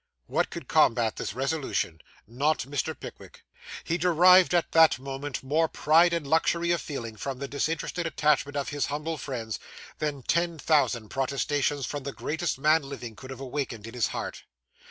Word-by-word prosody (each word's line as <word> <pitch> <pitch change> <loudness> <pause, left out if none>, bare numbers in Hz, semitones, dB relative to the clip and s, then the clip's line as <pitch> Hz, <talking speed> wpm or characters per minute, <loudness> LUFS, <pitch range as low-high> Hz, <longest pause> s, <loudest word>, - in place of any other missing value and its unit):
Who - - +2
could - - -9
combat 115 -1 +3
this 95 - -4
resolution? 135 - -2 0.2
Not 140 +7 0
Mr. 140 +1 -3
Pickwick. - - -11 0.4
He 170 +1 -1
derived, 180 +1 +6
at 170 - +1
that 165 -1 +6
moment, 135 +1 -5
more 155 +5 +2
pride 165 +3 +4
and 170 -3 -1
luxury 170 +3 +2
of 175 - +1
feeling 115 -7 -6
from 135 +3 -4
the 140 +1 -5
disinterested 160 +4 -2
attachment 150 -2 +1
of 140 - -2
his 145 -1 -1
humble 150 +2 -3
friends, 115 -5 -4 0.4
than 145 -3 -2
ten 170 +2 0
thousand 135 -8 +1
protestations 140 +1 -1
from 145 +3 -4
the 135 +1 -5
greatest 160 0 -2
men 155 +4 +4
living 135 -5 -8
could 130 - -11
have 130 -2 -7
awakened 130 -5 -4
in 115 - -9
his 125 -3 +1
heart. - - -6
145 Hz, 170 wpm, -27 LUFS, 130-160 Hz, 0.4 s, derived